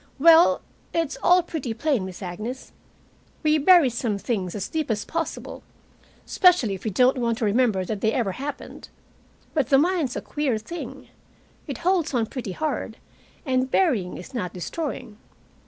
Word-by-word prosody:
Well, 330 +4 +6 0.3
it's 330 -3 0
all 360 0 +5
pretty 275 -9 -4
plain, 265 -5 0
Miss 185 +1 -9
Agnes. 215 +9 -6 0.7
We 305 0 +3
bury 315 -3 +6
some 230 -3 -2
things 195 -4 -3
as 200 -2 -3
deep 315 -4 -3
as 210 -2 -1
possible, 330 0 -4 0.6
especially 360 - +4
if 190 - -7
we - - +1
don't 250 +6 +3
want 235 -2 0
to 225 - -1
remember 210 -3 +2
that 205 +1 -4
they 220 - +2
ever 225 -6 0
happened. 280 +8 -7 0.6
But 285 -6 0
the 270 - +6
mind's 320 -4 +1
a - - -3
queer 285 -6 -1
thing. 335 +11 -8 0.6
It - - -4
holds 350 -6 +2
on 230 -2 +2
pretty 225 -4 -6
hard, 275 - -3 0.5
and 260 -1 +1
burying 250 - +1
is 225 +9 -11
not 180 -8 -3
destroying. 225 - -5
255 Hz, 160 wpm, -24 LUFS, 215-310 Hz, 0.7 s, Well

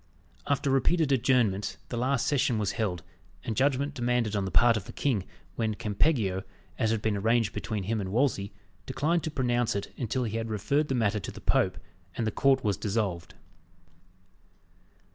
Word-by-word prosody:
After 140 -1 +1
repeated 145 +3 +2
adjournments, 120 -6 +2
the - - -4
last 130 +2 +1
session 130 -5 +2
was 105 -2 0
held, 100 -5 -2 0.4
and 110 - -3
judgment 140 +2 +1
demanded 120 -4 0
on 100 -1 0
the - - -2
part 115 +8 +5
of 105 -3 -3
the - - -9
king, 115 -10 0 0.3
when 110 -2 0
Campeggio, 105 -3 +1 0.4
as 110 - +2
had 110 -1 -1
been 110 -2 +1
arranged 115 +2 +2
between 105 -3 -3
him 110 +2 -1
and 95 -1 -4
Wolsey, 110 -4 +1 0.4
declined 165 +4 +1
to - - -1
pronounce 120 -6 0
it 100 - -4
until 125 +1 -1
he 115 -1 -2
had 115 0 -3
referred 140 +8 0
the 135 - -1
matter 110 -3 +1
to - - -6
the - - -10
Pope, - - +1 0.4
and 115 - 0
the 110 - 0
court 135 +4 +3
was 105 -4 +1
dissolved. 100 -5 -2
115 Hz, 180 wpm, -28 LUFS, 105-130 Hz, 0.4 s, part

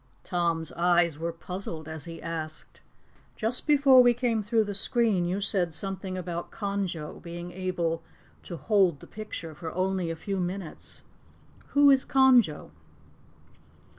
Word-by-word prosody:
Tom's 170 -3 0
eyes 170 -3 +2
were 170 +1 -2
puzzled 165 -1 -2
as 160 -1 -3
he 165 -1 -8
asked: 160 -2 -6 0.5
"Just 230 +6 -1
before 280 -3 +6
we 245 -1 +4
came 235 -2 0
through 220 +2 +1
the 205 -1 -5
screen, 205 -2 +1
you 180 +3 -1
said 185 -5 0
something 190 +1 -1
about 175 -1 -5
Conjo 200 -7 -4
being 175 0 -8
able 175 -3 -2 0.4
to 170 - -8
'hold 190 -6 +2
the - - -13
picture 205 -7 -8
for 160 +1 -7
only 185 -1 -1
a 165 - -3
few 195 +3 -4
minutes.' 180 -1 -6 0.7
Who 285 0 +7
is 265 -1 +4
Conjo?" 250 - +3
185 Hz, 140 wpm, -27 LUFS, 170-210 Hz, 0.7 s, Who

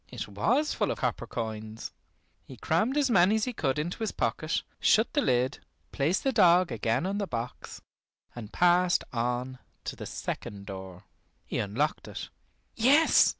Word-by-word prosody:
It - - -6
was 235 - +1
full - - 0
of - - -2
copper - - -2
coins. 110 -1 -5 0.5
He 130 - -12
crammed 215 - +1
as 280 -4 +2
many 195 0 +5
as 220 - 0
he 250 - -3
could 135 - -1
into 165 +7 -3
his 220 -2 -1
pocket, 155 0 -1 0.2
shut 220 +2 +3
the 290 - +2
lid, 125 - +1 0.3
placed 155 +7 0
the 270 - +2
dog 180 - +5
again 115 - 0
on 200 +2 -1
the 200 - -2
box, 120 -2 -6 0.5
and 110 -3 -8
passed 180 0 +3
on 125 +2 -2 0.2
to - - -5
the - - -7
second 100 -1 -5
door. 95 -1 -8 0.4
He - - -3
unlocked 125 +10 -1
it. - - -7 0.4
Yes! 280 +8 +5
150 Hz, 165 wpm, -28 LUFS, -, 0.5 s, many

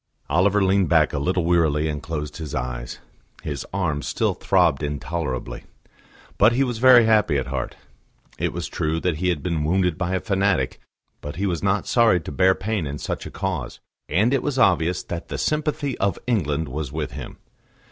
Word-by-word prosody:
Oliver 100 +3 +3
leaned 95 0 +2
back 80 -3 +3
a 75 - -1
little 90 +4 0
wearily 80 -3 +2
and 75 -2 -3
closed 75 -1 -5
his 80 -4 -6
eyes; - - -4 0.5
his 75 -3 -5
arm 80 -7 -1
still - - 0
throbbed 70 - +2
intolerably. 75 -2 -4 0.8
But 110 +4 +6
he 135 +3 +2
was 120 -4 -3
very 125 -2 +7
happy 105 -9 +3
at 65 - -1
heart. 65 -1 -4 0.6
It - - 0
was - - -4
true 80 +1 -1
that 85 -2 -1
he 90 +3 0
had 80 -6 -1
been 85 -4 -1
wounded 90 +1 +1
by 90 0 -1
a - - +1
fanatic, 100 - 0 0.4
but 75 - -6
he 100 - -2
was 85 -4 -1
not 100 +1 +1
sorry 115 -7 +4
to - - -7
bear 95 +6 +3
pain 100 -5 -2
in 70 +1 -4
such - - -4
a - - -7
cause, - - -4 0.3
and 105 - +2
it 135 - +2
was 145 -3 -2
obvious 90 -6 +2
that 85 0 -6
the - - -4
sympathy 150 -3 -1
of 100 -2 +1
England 80 - 0
was 70 +1 -4
with 75 -1 -3
him. - - -8
85 Hz, 190 wpm, -23 LUFS, 75-100 Hz, 0.8 s, very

